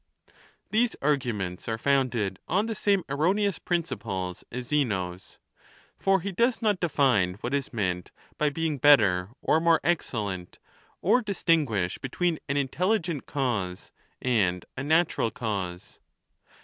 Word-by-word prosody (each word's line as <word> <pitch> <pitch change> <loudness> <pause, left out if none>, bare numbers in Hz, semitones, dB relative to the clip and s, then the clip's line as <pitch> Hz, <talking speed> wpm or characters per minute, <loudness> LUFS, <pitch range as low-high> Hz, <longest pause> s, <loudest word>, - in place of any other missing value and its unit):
These 230 +2 +2
arguments 120 -10 -1
are 110 - -1
founded 120 -7 +1
on 195 +5 +1
the 225 - -2
same 200 -2 +1
erroneous 185 +8 +1
principles 100 - -3
as 125 +1 -5
Zeno's, 95 -11 -1 0.6
for 195 -1 +2
he 200 - -3
does 235 +6 +1
not 210 -5 +1
define 125 - +2
what 125 - -3
is 140 -1 -1
meant 90 -6 -2 0.3
by 150 - +3
being 155 -1 -2
better 105 -10 +5
or 160 - +3
more 165 -1 +4
excellent, 105 - -2 0.5
or 250 - +4
distinguish 155 - 0
between 165 +5 -1
an 140 - +1
intelligent 170 - 0
cause 110 -10 -2 0.3
and 95 -8 +1
a 130 - -4
natural 160 -5 +2
cause. 100 -6 -5
140 Hz, 125 wpm, -27 LUFS, -, 0.6 s, better